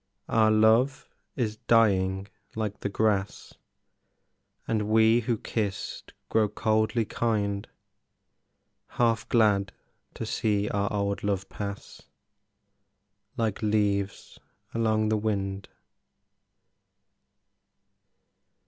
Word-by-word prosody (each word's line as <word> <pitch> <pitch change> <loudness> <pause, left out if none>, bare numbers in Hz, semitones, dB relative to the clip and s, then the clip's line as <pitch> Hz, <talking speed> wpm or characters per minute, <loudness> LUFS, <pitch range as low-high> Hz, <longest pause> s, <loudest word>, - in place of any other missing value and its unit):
Our 110 -1 +3
love 110 +5 +3 0.3
is 110 -4 -2
dying 95 -4 +2 0.3
like 105 -2 -3
the 100 - -3
grass, 105 -1 -1 1.1
And 105 -2 -1
we 110 +1 +5
who 115 -1 -1
kissed 105 -3 -4
grow 110 -2 +2
coldly 110 +2 +1
kind, 100 -3 -1 1.3
Half 115 -3 +1
glad 105 -4 +3 0.4
to - - -4
see 105 -2 0
our 100 0 -1
old 100 -1 -1
love 100 -2 -1
pass 100 0 -7 1.4
Like 110 -4 -1
leaves 105 -2 -1 0.3
along 110 -1 +1
the 110 - +2
wind. 100 -2 -2
105 Hz, 85 wpm, -27 LUFS, 100-110 Hz, 1.4 s, we